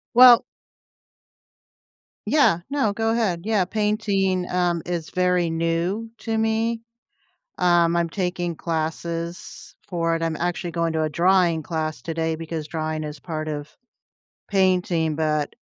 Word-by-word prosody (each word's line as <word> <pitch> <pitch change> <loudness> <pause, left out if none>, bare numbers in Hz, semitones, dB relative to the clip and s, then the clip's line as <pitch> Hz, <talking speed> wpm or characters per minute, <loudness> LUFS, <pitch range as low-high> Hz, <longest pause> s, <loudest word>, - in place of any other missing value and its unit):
Well 245 -1 +9 1.9
yeah. 285 - +4
No, 275 -8 +1
go 225 +2 0
ahead, 195 -7 0
yeah, 215 -3 +2
painting, 195 -2 0
um, 175 -2 +1
is 170 -3 -4
very 180 -2 +2
new 170 +7 -1
to 225 -1 -2
me. 225 +1 0 0.8
Um, 170 -1 +3
I'm 170 0 +2
taking 175 -1 -2
classes 165 +1 -4 0.2
for 165 -2 0
it. 165 - -3
I'm 165 -1 -1
actually 175 +1 -2
going 165 -1 -1
to 160 - 0
a 155 - 0
drawing 170 0 +3
class 155 -2 -3
today 165 -1 -1
because 160 -1 -5
drawing 155 -1 -3
is 150 -1 -7
part 155 -2 -5
of 150 0 -5 0.7
painting, 180 -5 +1
but, 150 -2 -1
170 Hz, 130 wpm, -23 LUFS, 160-190 Hz, 1.9 s, Well